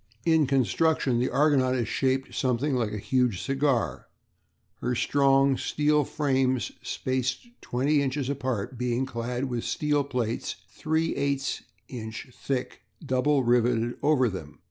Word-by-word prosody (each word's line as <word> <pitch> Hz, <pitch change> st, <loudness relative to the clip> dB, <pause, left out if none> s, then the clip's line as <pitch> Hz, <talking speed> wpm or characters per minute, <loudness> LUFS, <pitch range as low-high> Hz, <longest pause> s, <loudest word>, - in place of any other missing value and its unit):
In 160 Hz, -3 st, +4 dB
construction 135 Hz, 0 st, +2 dB
the 125 Hz, -, +1 dB
Argonaut 135 Hz, -3 st, +3 dB
is 120 Hz, -4 st, -1 dB
shaped 135 Hz, 0 st, 0 dB
something 130 Hz, +2 st, 0 dB
like 115 Hz, -4 st, 0 dB
a 105 Hz, -, -4 dB
huge 125 Hz, -2 st, +1 dB
cigar, 135 Hz, -5 st, 0 dB, 0.7 s
her 125 Hz, 0 st, -2 dB
strong 135 Hz, +1 st, +3 dB
steel 150 Hz, -1 st, +1 dB
frames, 130 Hz, -4 st, 0 dB
spaced 130 Hz, -, -2 dB, 0.2 s
twenty 140 Hz, +4 st, +1 dB
inches 135 Hz, -1 st, -1 dB
apart, 130 Hz, -4 st, -3 dB
being 125 Hz, +1 st, 0 dB
clad 125 Hz, 0 st, -3 dB
with 120 Hz, -3 st, -3 dB
steel 150 Hz, -1 st, 0 dB
plates 125 Hz, -4 st, -2 dB, 0.2 s
3/8 140 Hz, -4 st, -1 dB, 0.3 s
inch 110 Hz, 0 st, -7 dB
thick 130 Hz, 0 st, -4 dB, 0.2 s
double 135 Hz, +1 st, +2 dB
riveted 120 Hz, -1 st, +2 dB
over 140 Hz, -3 st, +3 dB
them. 90 Hz, -8 st, -7 dB
130 Hz, 125 wpm, -27 LUFS, 120-140 Hz, 0.7 s, In